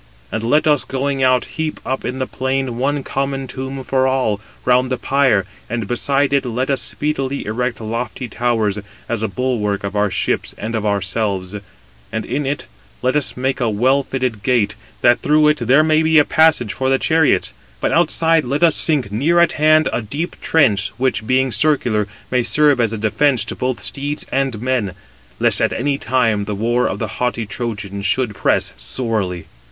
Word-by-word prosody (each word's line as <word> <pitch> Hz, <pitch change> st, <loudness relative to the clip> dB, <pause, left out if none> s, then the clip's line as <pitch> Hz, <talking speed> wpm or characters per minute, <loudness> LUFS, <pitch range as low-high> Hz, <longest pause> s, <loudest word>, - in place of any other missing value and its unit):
And 110 Hz, -, -3 dB
let 145 Hz, +7 st, +2 dB
us, 150 Hz, -3 st, +3 dB
going 135 Hz, +1 st, -2 dB
out, 130 Hz, -1 st, +3 dB
heap 160 Hz, -1 st, -4 dB
up 130 Hz, +1 st, -2 dB
in 130 Hz, -, -3 dB
the 130 Hz, -, -1 dB
plain 130 Hz, -2 st, -2 dB
one 140 Hz, +2 st, 0 dB
common 135 Hz, 0 st, -2 dB
tomb 130 Hz, +1 st, -6 dB
for 130 Hz, 0 st, +1 dB
all, 125 Hz, -6 st, 0 dB, 0.2 s
round 125 Hz, +1 st, +3 dB
the 130 Hz, -, 0 dB
pyre, 130 Hz, -9 st, +2 dB, 0.2 s
and 115 Hz, -2 st, -3 dB
beside 140 Hz, +4 st, +1 dB
it 140 Hz, -, +3 dB
let 125 Hz, +2 st, -2 dB
us 135 Hz, -, 0 dB
speedily 140 Hz, -2 st, -3 dB
erect 120 Hz, +3 st, -2 dB
lofty 115 Hz, +3 st, -4 dB
towers, 110 Hz, -3 st, 0 dB, 0.3 s
as 115 Hz, -2 st, -2 dB
a 110 Hz, -, 0 dB
bulwark 110 Hz, -7 st, -1 dB
of 100 Hz, +1 st, -4 dB
our 105 Hz, 0 st, +2 dB
ships 85 Hz, -4 st, -2 dB
and 110 Hz, +3 st, -5 dB
of 110 Hz, -2 st, -1 dB
ourselves; 100 Hz, -1 st, -1 dB, 0.6 s
and 110 Hz, -1 st, -3 dB
in 140 Hz, +1 st, -2 dB
it 145 Hz, +1 st, -2 dB, 0.4 s
let 130 Hz, +2 st, +1 dB
us 150 Hz, -4 st, -1 dB
make 130 Hz, +2 st, -1 dB
a 120 Hz, -3 st, +1 dB
well 130 Hz, +6 st, +2 dB
fitted 130 Hz, -5 st, -3 dB
gate, 110 Hz, -4 st, +1 dB, 0.3 s
that 120 Hz, 0 st, +4 dB
through 150 Hz, 0 st, +4 dB
it 150 Hz, -, +3 dB
there 130 Hz, +6 st, +4 dB
may 155 Hz, 0 st, +3 dB
be 160 Hz, 0 st, +3 dB
a 150 Hz, -, +6 dB
passage 155 Hz, -9 st, +3 dB
for 130 Hz, 0 st, -1 dB
the 135 Hz, -, +3 dB
chariots. 160 Hz, +2 st, +2 dB, 0.3 s
But -, -, 0 dB
outside 165 Hz, -1 st, +3 dB
let 140 Hz, +6 st, -1 dB
us 165 Hz, -2 st, +5 dB
sink, 140 Hz, -10 st, 0 dB
near 150 Hz, +11 st, +2 dB
at 170 Hz, -, +5 dB
hand, 155 Hz, +1 st, +4 dB
a -, -, 0 dB
deep 145 Hz, +11 st, -5 dB
trench, 115 Hz, -11 st, +2 dB
which, 125 Hz, -4 st, -1 dB
being 130 Hz, 0 st, +2 dB
circular, 115 Hz, -4 st, +1 dB, 0.2 s
may 125 Hz, -1 st, +3 dB
serve 135 Hz, +3 st, +3 dB
as 115 Hz, -2 st, +1 dB
a 115 Hz, -, -3 dB
defence 115 Hz, +2 st, +1 dB
to -, -, -5 dB
both 130 Hz, -1 st, -2 dB
steeds 145 Hz, +2 st, -3 dB
and 135 Hz, -4 st, 0 dB
men, 125 Hz, -7 st, 0 dB, 0.5 s
lest -, -, +3 dB
at -, -, +2 dB
any 140 Hz, +3 st, -1 dB
time 115 Hz, -4 st, +1 dB
the 105 Hz, 0 st, -3 dB
war 120 Hz, +4 st, +1 dB
of -, -, -3 dB
the 110 Hz, -, -3 dB
haughty 125 Hz, -2 st, 0 dB
Trojans 100 Hz, -3 st, -4 dB
should 120 Hz, 0 st, 0 dB
press -, -, 0 dB
sorely." 95 Hz, -, -1 dB
130 Hz, 190 wpm, -18 LUFS, 110-140 Hz, 0.6 s, a